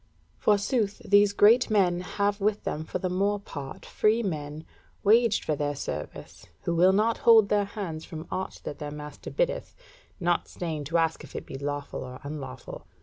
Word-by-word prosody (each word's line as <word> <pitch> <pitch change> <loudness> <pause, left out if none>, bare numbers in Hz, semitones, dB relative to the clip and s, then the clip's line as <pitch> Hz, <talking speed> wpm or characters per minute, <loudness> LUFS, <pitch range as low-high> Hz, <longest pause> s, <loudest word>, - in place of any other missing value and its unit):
Forsooth 205 0 +1
these 205 0 +5
great 225 +5 +5
men 185 -5 +3
have 200 +2 -1
with 210 +1 +1
them 155 - -3
for - - -3
the 185 - -2
more 200 +3 +1
part 140 -8 -8
free 220 +2 +2
men 155 -4 -4 0.4
waged 225 +1 +4
for 155 - +1
their 145 0 -2
service, - - -7 0.2
who 170 - 0
will 180 +3 +5
not 215 +4 +2
hold 225 -3 +6
their 205 -1 +2
hands 190 -6 -5
from 160 0 -8
aught 185 +1 -4
that 145 - -6
their 150 - -4
master 150 -1 -8
biddeth, - - -1 0.4
not 175 -2 +1
staying 160 -4 -4
to 165 +4 0
ask 165 -1 +1
if - - -13
it - - -5
be - - -8
lawful 145 0 -4
or 125 0 -8
unlawful. 140 -3 -7
185 Hz, 180 wpm, -27 LUFS, 150-205 Hz, 0.4 s, hold